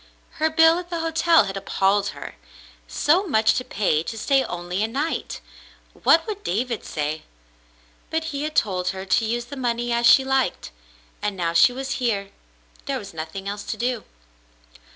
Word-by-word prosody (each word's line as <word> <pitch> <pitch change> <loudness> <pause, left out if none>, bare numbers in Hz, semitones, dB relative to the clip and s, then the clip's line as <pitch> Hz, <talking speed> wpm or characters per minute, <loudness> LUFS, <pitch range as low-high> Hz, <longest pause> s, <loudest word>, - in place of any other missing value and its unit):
Her 315 +1 +3
bill 325 +2 +5
at 355 -1 -9
the 340 -2 -3
hotel 330 -1 +4
had 195 -1 -5
appalled 195 +1 +1
her. - - -7 0.5
So 360 +7 +2
much 220 -8 +3
to 255 - -2
pay 195 -10 0
to 225 +7 -6
stay 270 +4 +2
only 180 -2 -4
a 215 - +1
night! 285 +8 -3 0.5
What 325 0 +3
would 415 -2 -6
David 230 +5 -2
say? 150 +1 -3 0.9
But 320 0 -1
he 280 - -3
had 305 +1 -4
told 185 -4 +1
her 190 +1 -3
to 220 +4 +2
use 240 +2 -2
the 280 - -9
money 240 -1 -1
as 235 0 +3
she 265 - +7
liked, 265 - 0 0.5
and 205 -2 -2
now 170 -2 -1
she 170 +9 +6
was 265 +1 -4
here, 200 -5 -1 0.6
there - - -1
was - - -9
nothing 165 +5 -6
else 205 +1 -4
to - - -4
do. 240 -2 -2
235 Hz, 175 wpm, -23 LUFS, 195-285 Hz, 0.9 s, she